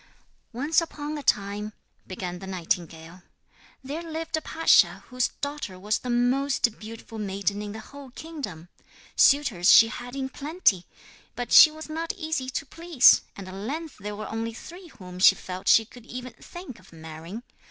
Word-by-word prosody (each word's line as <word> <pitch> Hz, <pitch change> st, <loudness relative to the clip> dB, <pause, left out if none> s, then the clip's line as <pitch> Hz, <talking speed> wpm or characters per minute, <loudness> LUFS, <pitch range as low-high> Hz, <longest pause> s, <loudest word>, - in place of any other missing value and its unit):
'Once 290 Hz, +8 st, +1 dB
upon 300 Hz, -2 st, -5 dB
a 295 Hz, -, -5 dB
time,' 210 Hz, -3 st, 0 dB, 0.3 s
began 180 Hz, -1 st, -6 dB
the 190 Hz, -, -9 dB
nightingale, 170 Hz, -1 st, -4 dB, 0.6 s
'there 290 Hz, +5 st, -5 dB
lived 325 Hz, -1 st, -4 dB
a 315 Hz, -, -2 dB
pasha 325 Hz, +1 st, +3 dB
whose 250 Hz, -1 st, +1 dB
daughter 285 Hz, -10 st, -4 dB
was 210 Hz, +4 st, -1 dB
the 250 Hz, -, -7 dB
most 245 Hz, 0 st, +1 dB
beautiful 225 Hz, 0 st, -9 dB
maiden 200 Hz, 0 st, -2 dB
in 210 Hz, 0 st, -6 dB
the 220 Hz, -, -7 dB
whole 280 Hz, +4 st, -12 dB
kingdom. 255 Hz, -, -8 dB, 0.5 s
Suitors 235 Hz, -11 st, +4 dB
she 225 Hz, -, +8 dB
had 245 Hz, +3 st, -8 dB
in 270 Hz, -1 st, -2 dB
plenty, 280 Hz, -, 0 dB, 0.5 s
but 245 Hz, -1 st, -5 dB
she 315 Hz, -, +10 dB
was 310 Hz, +1 st, -10 dB
not 325 Hz, +4 st, -3 dB
easy 315 Hz, -6 st, -3 dB
to 275 Hz, -, -4 dB
please, 330 Hz, -2 st, +5 dB
and 195 Hz, -2 st, -9 dB
at 185 Hz, -, -9 dB
length 280 Hz, +11 st, -5 dB
there 210 Hz, +1 st, -6 dB
were 215 Hz, +1 st, -6 dB
only 225 Hz, 0 st, -4 dB
three 350 Hz, +8 st, -11 dB
whom 180 Hz, -, -11 dB
she -, -, +7 dB
felt 185 Hz, 0 st, -8 dB
she 225 Hz, -, +6 dB
could 245 Hz, +1 st, -16 dB
even 250 Hz, +1 st, -7 dB
think 350 Hz, -9 st, -10 dB
of 185 Hz, +1 st, -20 dB
marrying. 160 Hz, +6 st, -9 dB
240 Hz, 170 wpm, -26 LUFS, 195-290 Hz, 0.6 s, she